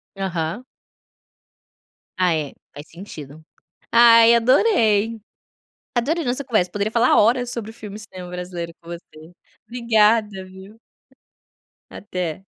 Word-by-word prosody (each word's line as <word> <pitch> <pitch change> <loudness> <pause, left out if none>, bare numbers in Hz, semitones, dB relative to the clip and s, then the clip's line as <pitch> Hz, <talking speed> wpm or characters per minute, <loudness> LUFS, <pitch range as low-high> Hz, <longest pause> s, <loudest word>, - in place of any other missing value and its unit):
Aham. 190 +4 -4 1.5
Ah 180 -2 +2
é 150 -3 -3 0.2
faz 145 +2 -11
sentido. 155 -4 -11 0.5
Ai 230 0 +7
adorei. 230 - +2 0.8
Adorei 300 +7 0
nossa 255 +3 -2
conversa 215 -8 0
poderia 205 +1 -2
falar 240 +1 +3
horas 245 +3 +2
sobre 230 -3 -5
o - - -14
filme 210 -2 -9
cinema 185 -4 -10
brasileiro 180 -1 -6
com 170 - -17
você. 170 -1 -11 0.4
Obrigada 220 -4 +1
viu. 190 +4 -14 1.1
Até. 180 -2 -6
210 Hz, 110 wpm, -21 LUFS, 180-235 Hz, 1.5 s, Ai